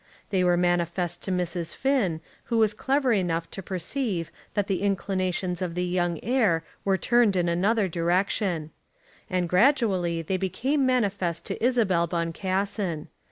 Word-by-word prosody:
They 190 Hz, -2 st, +2 dB
were 175 Hz, -1 st, +3 dB
manifest 175 Hz, 0 st, 0 dB
to 190 Hz, -, -4 dB
Mrs. 175 Hz, -2 st, -2 dB
Finn, 235 Hz, -, +1 dB, 0.2 s
who 230 Hz, -, -1 dB
was 215 Hz, -2 st, +3 dB
clever 265 Hz, +3 st, +1 dB
enough 170 Hz, -5 st, -1 dB
to 195 Hz, -, -6 dB
perceive 185 Hz, -, -3 dB, 0.2 s
that 205 Hz, -2 st, +1 dB
the 195 Hz, -2 st, -1 dB
inclinations 185 Hz, -2 st, -1 dB
of 175 Hz, -2 st, -3 dB
the 180 Hz, 0 st, 0 dB
young 175 Hz, -2 st, 0 dB
heir 215 Hz, -9 st, +2 dB, 0.2 s
were 195 Hz, -1 st, +2 dB
turned 235 Hz, -1 st, +3 dB
in 175 Hz, -1 st, +1 dB
another 195 Hz, +5 st, +2 dB
direction. 175 Hz, -1 st, 0 dB, 0.6 s
And 180 Hz, -1 st, 0 dB
gradually 185 Hz, -, +2 dB
they 185 Hz, +4 st, -1 dB
became 260 Hz, -, 0 dB
manifest 195 Hz, -9 st, 0 dB
to -, -, -4 dB
Isabel 210 Hz, -9 st, +2 dB
Boncassen. 185 Hz, +1 st, -2 dB
185 Hz, 145 wpm, -26 LUFS, 175-210 Hz, 0.6 s, were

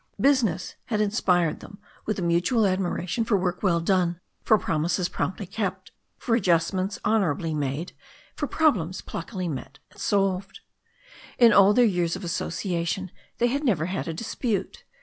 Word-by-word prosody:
Business 225 Hz, -, +2 dB
had 220 Hz, -4 st, -1 dB
inspired 185 Hz, -6 st, +1 dB
them 200 Hz, -, -12 dB, 0.3 s
with 215 Hz, -, -1 dB
a 185 Hz, -, -2 dB
mutual 175 Hz, +7 st, +2 dB
admiration 185 Hz, +2 st, -1 dB
for 225 Hz, -2 st, +2 dB
work 180 Hz, -1 st, -2 dB
well 170 Hz, -4 st, +2 dB
done, 175 Hz, -1 st, +1 dB, 0.2 s
for 220 Hz, -, +4 dB
promises 175 Hz, +1 st, 0 dB
promptly 190 Hz, +2 st, -3 dB
kept, 195 Hz, -1 st, -4 dB, 0.3 s
for 235 Hz, -, -2 dB
adjustments 185 Hz, -1 st, +1 dB
honourably 175 Hz, -7 st, +1 dB
made, 150 Hz, +3 st, -3 dB, 0.4 s
for 295 Hz, -, -2 dB
problems 205 Hz, -, +1 dB
pluckily 180 Hz, +1 st, -5 dB
met 135 Hz, -2 st, -6 dB
and -, -, -18 dB
solved. 195 Hz, -1 st, 0 dB, 0.8 s
In 235 Hz, -3 st, +7 dB
all 200 Hz, 0 st, +6 dB
their 245 Hz, -, +6 dB
years 175 Hz, -5 st, +1 dB
of 190 Hz, -, -7 dB
association 175 Hz, +1 st, -2 dB, 0.3 s
they 240 Hz, -, +2 dB
had 275 Hz, +5 st, 0 dB
never 190 Hz, -, +1 dB
had 185 Hz, +2 st, -3 dB
a 165 Hz, -, -2 dB
dispute. 225 Hz, +1 st, -3 dB
185 Hz, 150 wpm, -25 LUFS, 170-215 Hz, 0.8 s, In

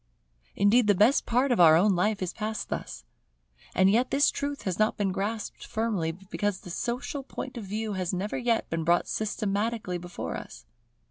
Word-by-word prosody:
Indeed 210 Hz, +3 st, +4 dB
the 205 Hz, -, +5 dB
best 215 Hz, +9 st, +4 dB
part 250 Hz, +3 st, +2 dB
of 240 Hz, -, +2 dB
our 160 Hz, -2 st, +8 dB
own 195 Hz, +3 st, +4 dB
life 205 Hz, +2 st, +1 dB
is 180 Hz, -, -3 dB
passed 215 Hz, 0 st, -4 dB
thus. -, -, -5 dB, 0.7 s
As 190 Hz, -, +5 dB
yet 235 Hz, +6 st, +3 dB
this 285 Hz, +2 st, +3 dB
truth 285 Hz, 0 st, -4 dB
has 185 Hz, -1 st, -2 dB
not 215 Hz, 0 st, +2 dB
been 200 Hz, -3 st, 0 dB
grasped 205 Hz, +3 st, -4 dB
firmly, 215 Hz, -8 st, -1 dB
because 195 Hz, +2 st, -3 dB
the 180 Hz, -, -9 dB
social 245 Hz, -, -3 dB
point 265 Hz, -1 st, -7 dB
of 230 Hz, -4 st, -6 dB
view 215 Hz, +2 st, -3 dB
has 185 Hz, -2 st, -2 dB
never 190 Hz, +2 st, -3 dB
yet 235 Hz, -2 st, +1 dB
been 165 Hz, 0 st, -1 dB
brought 170 Hz, +2 st, +2 dB
systematically 210 Hz, -2 st, -2 dB
before 175 Hz, 0 st, -6 dB
us. -, -, -10 dB
205 Hz, 185 wpm, -27 LUFS, 185-230 Hz, 0.7 s, our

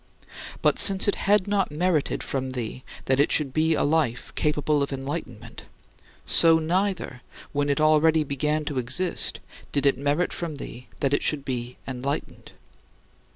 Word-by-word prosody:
But, -, -, +3 dB
since 195 Hz, 0 st, +5 dB
it 205 Hz, -, +3 dB
had 205 Hz, -1 st, +1 dB
not 200 Hz, -2 st, 0 dB
merited 155 Hz, 0 st, -1 dB
from 130 Hz, -1 st, -3 dB
thee 125 Hz, 0 st, -6 dB, 0.2 s
that 130 Hz, 0 st, +1 dB
it 145 Hz, -, +3 dB
should 140 Hz, -4 st, +1 dB
be 160 Hz, +1 st, +2 dB
a -, -, 0 dB
life 145 Hz, -6 st, 0 dB
capable 150 Hz, -1 st, 0 dB
of 140 Hz, -, -2 dB
enlightenment, 135 Hz, -5 st, -6 dB, 0.6 s
so 165 Hz, -1 st, +7 dB
neither, 175 Hz, -4 st, -2 dB, 0.3 s
when 145 Hz, 0 st, 0 dB
it 140 Hz, -, 0 dB
already 155 Hz, +1 st, +4 dB
began 150 Hz, +2 st, -2 dB
to 145 Hz, -3 st, -2 dB
exist, 165 Hz, +10 st, -1 dB, 0.3 s
did 140 Hz, -1 st, -1 dB
it 135 Hz, -2 st, +3 dB
merit 145 Hz, +5 st, 0 dB
from 165 Hz, -3 st, -5 dB
thee 125 Hz, -3 st, -9 dB
that 140 Hz, 0 st, +1 dB
it -, -, +2 dB
should 145 Hz, -3 st, -1 dB
be 125 Hz, -1 st, -5 dB
enlightened. 135 Hz, +2 st, -5 dB
145 Hz, 155 wpm, -25 LUFS, 135-160 Hz, 0.6 s, so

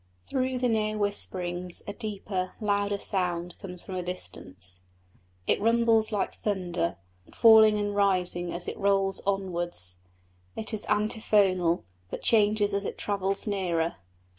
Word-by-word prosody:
Through 260 Hz, -, -2 dB
the 250 Hz, 0 st, 0 dB
near 215 Hz, -2 st, 0 dB
whisperings 180 Hz, -3 st, +2 dB
a 205 Hz, -, -5 dB
deeper, 200 Hz, -3 st, -4 dB
louder 205 Hz, -1 st, 0 dB
sound 180 Hz, -3 st, -2 dB
comes 180 Hz, -2 st, -5 dB
from 190 Hz, -, -8 dB
a 185 Hz, -, -2 dB
distance. 95 Hz, -, -5 dB, 0.7 s
It -, -, +1 dB
rumbles 230 Hz, 0 st, +3 dB
like 205 Hz, -2 st, -1 dB
thunder, 180 Hz, -4 st, -2 dB, 0.4 s
falling 220 Hz, -2 st, +7 dB
and 205 Hz, 0 st, -2 dB
rising 180 Hz, -3 st, +1 dB
as 175 Hz, +1 st, +3 dB
it -, -, -5 dB
rolls 195 Hz, -1 st, +1 dB
onwards; 175 Hz, -, 0 dB, 0.6 s
it 220 Hz, +1 st, -1 dB
is 215 Hz, -, 0 dB
antiphonal, 205 Hz, -5 st, +1 dB, 0.3 s
but -, -, -7 dB
changes 210 Hz, -2 st, +3 dB
as 200 Hz, 0 st, -1 dB
it -, -, -5 dB
travels 195 Hz, -1 st, -2 dB
nearer. 175 Hz, -5 st, -1 dB
195 Hz, 135 wpm, -27 LUFS, 180-210 Hz, 0.7 s, falling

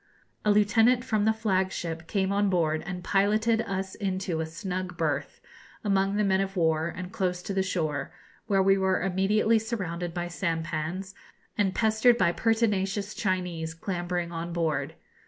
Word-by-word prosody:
A 210 Hz, -, +2 dB
lieutenant 225 Hz, +4 st, +4 dB
from 215 Hz, -3 st, +1 dB
the 220 Hz, -, +5 dB
flag 190 Hz, -4 st, 0 dB
ship 165 Hz, -1 st, -5 dB
came 195 Hz, -2 st, 0 dB
on 200 Hz, 0 st, +2 dB
board 160 Hz, -4 st, +1 dB
and 180 Hz, -2 st, -5 dB
piloted 215 Hz, +4 st, +2 dB
us 190 Hz, -2 st, -3 dB
into 185 Hz, -4 st, -2 dB
a 160 Hz, -, -3 dB
snug 180 Hz, +2 st, -5 dB
berth, 145 Hz, -3 st, -2 dB, 0.4 s
among 195 Hz, -1 st, +1 dB
the 210 Hz, -, +2 dB
men 190 Hz, -1 st, +2 dB
of 195 Hz, 0 st, -3 dB
war, 160 Hz, -1 st, +2 dB
and 180 Hz, +2 st, -6 dB
close 180 Hz, -2 st, -1 dB
to 200 Hz, -, -4 dB
the 190 Hz, -, +1 dB
shore, 165 Hz, -6 st, -2 dB, 0.4 s
where 195 Hz, -2 st, +3 dB
we 195 Hz, 0 st, +4 dB
were 190 Hz, -1 st, +1 dB
immediately 205 Hz, +4 st, +2 dB
surrounded 180 Hz, -6 st, -3 dB
by 175 Hz, +1 st, -3 dB
sampans, 165 Hz, +2 st, -3 dB, 0.4 s
and 195 Hz, -4 st, +1 dB
pestered 220 Hz, +2 st, +4 dB
by 170 Hz, -, +3 dB
pertinacious 205 Hz, -2 st, 0 dB
Chinese 180 Hz, -5 st, -2 dB
clambering 175 Hz, -1 st, -3 dB
on 170 Hz, +1 st, -4 dB
board. 160 Hz, -3 st, -1 dB
190 Hz, 160 wpm, -27 LUFS, 170-205 Hz, 0.4 s, the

